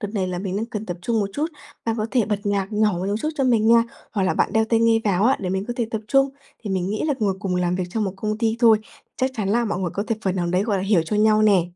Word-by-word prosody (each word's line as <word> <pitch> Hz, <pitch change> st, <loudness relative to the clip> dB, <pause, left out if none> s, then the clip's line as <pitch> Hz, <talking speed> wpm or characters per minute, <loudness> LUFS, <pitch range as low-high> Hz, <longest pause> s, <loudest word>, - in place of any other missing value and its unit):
đợt 205 Hz, -, -3 dB
này 190 Hz, -3 st, 0 dB
là 180 Hz, -1 st, -3 dB
mình 190 Hz, +1 st, -3 dB
đang 225 Hz, +2 st, -2 dB
cần 215 Hz, -2 st, -6 dB
tập 175 Hz, -1 st, -4 dB
trung 225 Hz, +2 st, 0 dB
một 200 Hz, -1 st, -2 dB
chút, 300 Hz, +2 st, -1 dB, 0.4 s
bạn 225 Hz, 0 st, -1 dB
có 215 Hz, -, -1 dB
thể 245 Hz, -5 st, +2 dB
bật 210 Hz, -2 st, -1 dB
nhạc 200 Hz, 0 st, -1 dB
nhỏ 210 Hz, -1 st, +2 dB
một 180 Hz, +2 st, -3 dB, 0.2 s
chút 305 Hz, -, 0 dB
cho 275 Hz, -3 st, 0 dB
mình 225 Hz, -3 st, +3 dB
nha, 230 Hz, 0 st, +6 dB, 0.3 s
hoặc 200 Hz, -, 0 dB
là 185 Hz, -, +1 dB
bạn -, -, +1 dB
đeo 220 Hz, 0 st, +3 dB
tai 225 Hz, 0 st, +1 dB
nghe 230 Hz, -1 st, +4 dB
vào 200 Hz, 0 st, +2 dB
á 260 Hz, +3 st, +4 dB
để 185 Hz, -, -3 dB
mình 190 Hz, +1 st, -1 dB
có -, -, -1 dB
thể 235 Hz, -3 st, 0 dB
tập 220 Hz, -, -2 dB
trung." 270 Hz, +2 st, +3 dB, 0.3 s
Thì 205 Hz, -, -5 dB
mình 185 Hz, 0 st, -1 dB
nghĩ 215 Hz, -, -2 dB
là 290 Hz, -, +1 dB
ngồi 200 Hz, -3 st, +1 dB
cùng 185 Hz, -2 st, -2 dB
làm 180 Hz, 0 st, 0 dB
việc 185 Hz, -, -1 dB
cho 220 Hz, -, -2 dB
một 195 Hz, -3 st, -1 dB
công 215 Hz, +2 st, -3 dB
ty 225 Hz, 0 st, +1 dB
thôi, 225 Hz, -3 st, +6 dB, 0.4 s
chắc 260 Hz, 0 st, 0 dB
chắn 205 Hz, -4 st, -2 dB
là 235 Hz, +3 st, +2 dB
mọi 205 Hz, -5 st, -2 dB
người 185 Hz, -2 st, -2 dB
có 200 Hz, -, -1 dB
thể 225 Hz, -, -1 dB
phần 190 Hz, -1 st, -1 dB
nào 175 Hz, -1 st, 0 dB
đấy, 180 Hz, +3 st, +1 dB
gọi 210 Hz, -2 st, 0 dB
là, 185 Hz, -, -2 dB
hiểu 195 Hz, -4 st, +3 dB
cho 210 Hz, +6 st, -2 dB
nhau 215 Hz, 0 st, +4 dB
nè. 200 Hz, -5 st, +5 dB
210 Hz, 325 wpm, -22 LUFS, 190-225 Hz, 0.4 s, nha